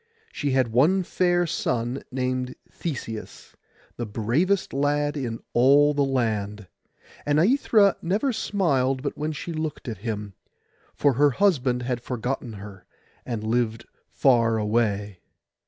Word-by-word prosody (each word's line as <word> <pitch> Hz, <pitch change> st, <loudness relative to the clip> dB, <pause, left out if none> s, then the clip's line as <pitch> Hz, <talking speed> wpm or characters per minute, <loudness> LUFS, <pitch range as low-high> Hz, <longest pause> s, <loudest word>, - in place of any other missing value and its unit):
She 145 Hz, -, -2 dB
had 130 Hz, -3 st, +2 dB
one 155 Hz, +12 st, +3 dB
fair 175 Hz, 0 st, +1 dB
son, 125 Hz, -5 st, -2 dB
named 130 Hz, 0 st, -2 dB, 0.2 s
Theseus, 115 Hz, -9 st, -6 dB, 0.4 s
the 120 Hz, -, -3 dB
bravest 130 Hz, -, 0 dB
lad 145 Hz, +1 st, +1 dB
in 120 Hz, -5 st, -4 dB
all 140 Hz, +4 st, +5 dB
the 145 Hz, -1 st, +2 dB
land; 110 Hz, -6 st, -1 dB, 0.6 s
and 145 Hz, 0 st, +1 dB
Aithra 205 Hz, -, +4 dB
never 210 Hz, +10 st, 0 dB
smiled 135 Hz, -, 0 dB
but 145 Hz, -, -3 dB
when 150 Hz, +1 st, -2 dB
she 160 Hz, +3 st, -6 dB
looked 155 Hz, -3 st, -4 dB
at 110 Hz, -5 st, -5 dB
him, 105 Hz, -2 st, -4 dB, 0.6 s
for 145 Hz, -2 st, +3 dB
her 145 Hz, +4 st, +4 dB
husband 135 Hz, -8 st, +1 dB
had 125 Hz, -1 st, -2 dB
forgotten 125 Hz, 0 st, -4 dB
her, 100 Hz, -2 st, -11 dB, 0.4 s
and 115 Hz, -4 st, -3 dB
lived 115 Hz, 0 st, -1 dB, 0.2 s
far 115 Hz, -4 st, +3 dB
away. 105 Hz, -3 st, 0 dB
130 Hz, 130 wpm, -25 LUFS, 115-150 Hz, 0.6 s, all